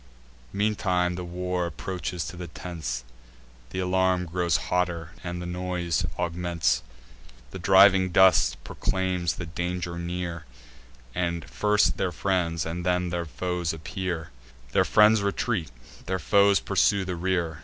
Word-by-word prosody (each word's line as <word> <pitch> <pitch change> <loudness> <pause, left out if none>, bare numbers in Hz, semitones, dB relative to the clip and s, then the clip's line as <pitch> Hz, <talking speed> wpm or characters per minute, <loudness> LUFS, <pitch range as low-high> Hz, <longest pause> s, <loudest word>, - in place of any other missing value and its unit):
Meantime 95 -4 +1
the 90 0 -5
war 90 0 -2
approaches 90 +1 -4
to - - -7
the 90 0 -6
tents; 80 -11 -5 0.7
Th' - - -10
alarm 95 0 +1
grows 85 0 +1
hotter, 85 -3 0
and 90 0 -4
the 90 - -5
noise 90 -1 -1
augments: 85 -8 0 0.7
The 95 - -7
driving 95 +1 +6
dust 95 +1 +5
proclaims 90 -2 -1
the 90 - -5
danger 85 +1 -3
near; 85 -1 -4 0.7
And 85 -3 -2
first 105 0 +2
their 95 - 0
friends, 85 -3 0
and 85 +2 -4
then 90 0 0
their 85 0 -2
foes 90 +1 -2
appear: 80 0 -4 0.4
Their - - +3
friends 105 0 +5
retreat; 100 -3 -1 0.4
their 95 +1 0
foes 100 +3 +4
pursue 100 -2 +2
the 90 -1 -3
rear. 85 -3 -1
90 Hz, 135 wpm, -26 LUFS, 85-95 Hz, 0.7 s, driving